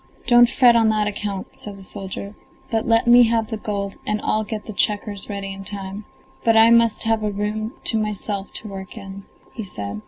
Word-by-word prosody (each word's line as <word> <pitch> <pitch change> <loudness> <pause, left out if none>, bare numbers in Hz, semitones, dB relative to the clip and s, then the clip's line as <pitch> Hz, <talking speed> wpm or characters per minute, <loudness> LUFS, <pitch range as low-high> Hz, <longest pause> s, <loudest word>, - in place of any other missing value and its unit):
"Don't 240 -1 +6
fret 245 -2 +5
on 225 -1 +4
that 215 -1 +1
account," 205 -2 -4
said 205 -1 -7
the 195 - -12
soldier, 195 +1 -7 0.4
"but 225 -1 0
let 230 0 +3
me 240 0 +7
have 225 -1 0
the 220 - -2
gold 200 -2 -4
and 210 0 -1
I'll 215 - +1
get 215 0 -6
the 215 - -7
checkers 205 0 -1
ready 200 -1 -4
in 195 0 -9
time; 195 +1 -6 0.4
but 225 -1 +4
I 225 +1 +7
must 230 -2 +4
have 225 -1 +1
a 210 - 0
room 210 +3 -3
to 225 - +1
myself 205 -1 -3
to 215 - -6
work 195 0 -8
in," 195 -1 -9 0.3
he 225 - -5
said. 105 - -6
210 Hz, 210 wpm, -22 LUFS, 200-225 Hz, 0.4 s, me